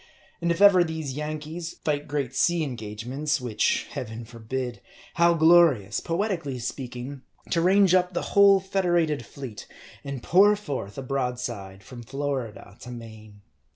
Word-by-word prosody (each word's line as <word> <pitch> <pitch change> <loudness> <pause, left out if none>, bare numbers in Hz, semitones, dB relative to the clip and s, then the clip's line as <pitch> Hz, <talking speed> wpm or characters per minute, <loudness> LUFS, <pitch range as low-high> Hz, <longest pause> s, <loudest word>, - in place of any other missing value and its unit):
And 170 - 0
if 170 +3 -2
ever 190 -3 +7
these 160 -4 -4
Yankees 155 +3 -5
fight 150 -1 -1
great 140 -3 -2
sea 175 -1 +2
engagements 125 +4 -3
which 120 -4 0
Heaven 115 0 -6
forefend! 120 +2 -5 0.3
how 170 0 +4
glorious, 160 - +5
poetically 170 -6 -2
speaking, 125 +2 -6 0.3
to 165 - +2
range 190 +1 +4
up 180 0 +3
the - - -1
whole 200 -1 +7
federated 175 -7 0
fleet, 110 -2 -9 0.4
and 140 -3 -6
pour 205 +4 +5
forth 140 - -6
a 135 - -4
broadside 125 -7 -4
from 120 0 -10
Florida 130 -5 -5
to 125 - -9
Maine. 110 -3 -11
140 Hz, 140 wpm, -26 LUFS, 120-170 Hz, 0.4 s, ever